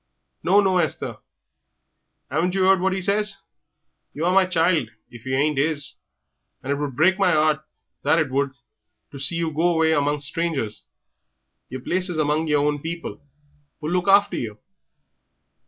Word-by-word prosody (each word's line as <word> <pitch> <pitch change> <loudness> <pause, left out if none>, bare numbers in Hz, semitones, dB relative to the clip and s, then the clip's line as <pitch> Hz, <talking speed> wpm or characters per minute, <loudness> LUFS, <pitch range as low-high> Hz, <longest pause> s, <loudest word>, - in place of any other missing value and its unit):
"No, 195 +4 +4
no, 190 -2 +2
Esther. 160 -5 -2 1.1
'Aven't 180 +3 0
yer 190 -1 +2
'eard 190 0 +5
what 190 +1 +1
'e 190 - -3
says? 205 +1 +1 0.8
Ye 150 - -3
are 180 +2 +2
my 190 -1 +4
child 165 -8 +1 0.2
if 120 +1 -12
you 130 - 0
ain't 145 +1 +1
'is, 145 -1 +1 0.7
and 135 - -3
it 140 - 0
would 145 -3 -4
break 185 +7 +3
my 185 -4 +3
'eart, 155 -1 +2 0.4
that - - +2
it 155 -5 0
would, 135 0 0 0.6
to 140 - -9
see 140 +5 +1
you 165 -1 -1
go 160 +3 +1
away 160 0 +3
among 145 -1 0
strangers. 145 -7 -3 0.8
Yer 130 0 -6
place 185 +6 +1
is 175 - -3
among 155 +1 0
yer 150 -1 +2
own 145 0 0
people, 170 +2 -6 0.6
who'll 155 +1 -4
look 180 +1 0
after 200 +1 +4
you." 110 -3 -5
160 Hz, 170 wpm, -23 LUFS, 145-180 Hz, 1.1 s, eard